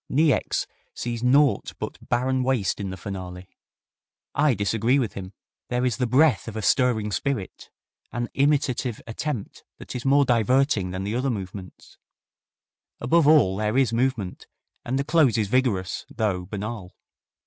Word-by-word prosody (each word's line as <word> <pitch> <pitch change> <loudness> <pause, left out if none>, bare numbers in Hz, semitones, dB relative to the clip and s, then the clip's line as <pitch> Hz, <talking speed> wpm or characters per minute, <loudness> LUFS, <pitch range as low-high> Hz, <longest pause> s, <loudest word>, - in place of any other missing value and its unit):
Niecks 150 0 +2 0.3
sees 120 -1 -4
naught 130 -2 +3
but - - -6
barren 130 +1 +1
waste 125 -7 0
in 100 -2 -3
the 95 - -6
finale. 90 -1 -7 0.9
I 145 -3 +3
disagree 115 +5 +1
with 120 -7 -1
him. 95 -1 -7 0.4
There 125 +1 0
is 125 - 0
the 125 - 0
breath 130 - +3
of 115 - -6
a 110 - -4
stirring 115 -5 +2
spirit, 125 -4 -3 0.4
an 120 0 -3
imitative 135 -4 +1
attempt 115 -1 -5
that - - -9
is 125 - -4
more 140 +1 +4
diverting 120 -3 +2
than 95 +1 -4
the 100 +2 -3
other 130 +3 0
movements. 95 -4 -7 1.0
Above 145 +5 +3
all 145 -12 +5
there 105 +3 0
is 130 -4 +2
movement, 115 -6 -1 0.4
and 130 +2 -2
the 140 - 0
close 140 -6 +3
is 105 -3 0
vigorous, 100 -8 0
though 100 -6 -2
banal. 105 -2 -6
120 Hz, 150 wpm, -24 LUFS, 100-130 Hz, 1.0 s, all